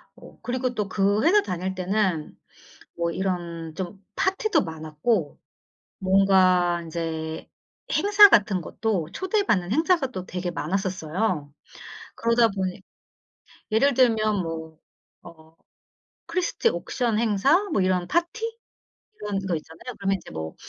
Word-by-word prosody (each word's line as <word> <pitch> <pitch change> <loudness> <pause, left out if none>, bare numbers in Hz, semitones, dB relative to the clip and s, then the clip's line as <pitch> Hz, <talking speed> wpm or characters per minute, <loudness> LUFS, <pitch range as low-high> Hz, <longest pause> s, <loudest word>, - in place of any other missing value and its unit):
어 - - -15
그리고 255 0 -2
또 210 -3 -2
그 200 +3 +1
회사 400 +6 +5
다닐 185 - -4
때는 185 -4 -1 0.6
뭐 170 0 -1
이런 170 -3 -3
좀 190 +2 -6
파티도 420 +3 +1
많았고 160 +2 -2 0.6
뭔가 185 -2 +3
인제 160 -1 -5 0.4
행사 410 0 +7
같은 200 - +3
것도 190 -2 -2
초대받는 375 - 0
행사가 320 -1 +2
또 185 -8 -6
되게 180 0 -4
많았었어요. 180 -2 -2 0.6
그러다 230 0 +3
보니 190 -1 -3 0.9
예를 245 +6 +3
들면 220 -5 +3
뭐 160 -1 -6 0.5
어 160 -1 -16 0.7
크리스티 365 +6 0
옥션 235 - -1
행사 235 - +3
뭐 195 - +2
이런 185 -1 +1
파티 345 +7 -1 0.8
이런 205 -1 -2
거 180 - 0
있잖아요. 160 +11 -9
그러면 195 0 +1
이제 - - -13
뭐 80 0 -6
190 Hz, 245 characters per minute, -25 LUFS, 170-235 Hz, 0.9 s, 행사